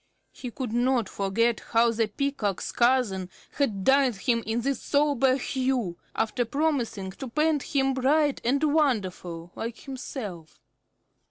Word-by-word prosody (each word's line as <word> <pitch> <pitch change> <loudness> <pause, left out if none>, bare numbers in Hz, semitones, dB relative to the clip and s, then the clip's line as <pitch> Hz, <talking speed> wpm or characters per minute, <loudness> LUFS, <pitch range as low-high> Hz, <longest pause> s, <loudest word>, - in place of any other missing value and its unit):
He 250 - -7
could 240 -1 -5
not 240 -2 +2
forget 215 +5 0
how 230 0 +2
the 225 -1 0
Peacock's 215 -4 -2
cousin 235 -7 +2 0.3
had 215 -9 0
dyed 270 -1 +4
him 230 +3 0
this 240 +4 -1
sombre 280 -3 +2
hue, 255 -8 -1 0.2
after 225 +2 0
promising 245 -8 -1
to 265 +8 -8
paint 305 +3 +1
him 270 -1 0
bright 280 +2 +2
and 275 +5 +1
wonderful, 195 - 0
like 230 +1 -6
himself. 215 - -7
245 Hz, 125 wpm, -27 LUFS, 215-275 Hz, 0.3 s, dyed